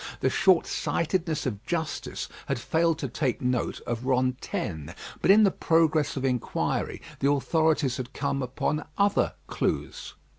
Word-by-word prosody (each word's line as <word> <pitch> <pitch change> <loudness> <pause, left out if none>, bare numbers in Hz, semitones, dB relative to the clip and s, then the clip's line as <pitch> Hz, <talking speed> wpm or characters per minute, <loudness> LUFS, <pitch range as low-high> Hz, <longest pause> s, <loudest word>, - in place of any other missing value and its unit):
The - - +2
shortsightedness 170 -2 +1
of 105 -6 -3
justice 160 -3 -3 0.2
had - - 0
failed 165 0 +1
to - - -3
take 130 -5 -1
note 125 -1 -1
of 120 +2 -3
Rantaine; 125 - -1 0.3
but - - +1
in 210 +3 +8
the 195 - +5
progress 160 -4 +2
of 135 - -1
inquiry 125 -3 -1 0.2
the 140 - +2
authorities 150 -2 +2
had 130 -1 -5
come 140 -1 -2
upon 135 +4 -1
other 200 0 +2
clues. - - -3
140 Hz, 140 wpm, -27 LUFS, 125-165 Hz, 0.3 s, in